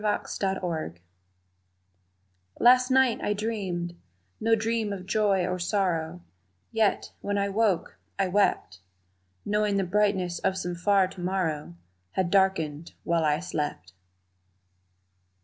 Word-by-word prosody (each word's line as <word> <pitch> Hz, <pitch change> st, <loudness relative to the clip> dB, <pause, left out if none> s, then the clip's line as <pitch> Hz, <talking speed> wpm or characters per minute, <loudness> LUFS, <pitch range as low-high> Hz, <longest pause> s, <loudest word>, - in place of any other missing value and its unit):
Premonition 190 Hz, -, -2 dB, 1.6 s
LAST 250 Hz, +1 st, +6 dB
night 260 Hz, -2 st, +3 dB
I 205 Hz, -, 0 dB
dreamed 195 Hz, -5 st, -3 dB, 0.4 s
No 225 Hz, +1 st, +3 dB
dream 225 Hz, -1 st, -1 dB
of 190 Hz, -2 st, -5 dB
joy 195 Hz, -2 st, +2 dB
or 180 Hz, 0 st, -2 dB
sorrow, 175 Hz, -3 st, -1 dB, 0.5 s
Yet, 220 Hz, -3 st, +1 dB
when 205 Hz, 0 st, -1 dB
I 200 Hz, 0 st, 0 dB
woke, 200 Hz, -3 st, 0 dB, 0.2 s
I 195 Hz, -, +1 dB
wept, 195 Hz, -, +1 dB, 0.7 s
Knowing 210 Hz, -1 st, +1 dB
the 195 Hz, -, +2 dB
brightness 190 Hz, -2 st, +1 dB
of 190 Hz, -, 0 dB
some 180 Hz, -1 st, -3 dB
far 190 Hz, +2 st, +3 dB
to 190 Hz, -1 st, -10 dB
morrow 165 Hz, -, -2 dB, 0.4 s
Had 185 Hz, -2 st, 0 dB
darkened 170 Hz, -6 st, +1 dB
while 170 Hz, -1 st, +1 dB
I 150 Hz, -1 st, +2 dB
slept! 150 Hz, -, -4 dB
190 Hz, 115 wpm, -27 LUFS, 175-210 Hz, 1.6 s, LAST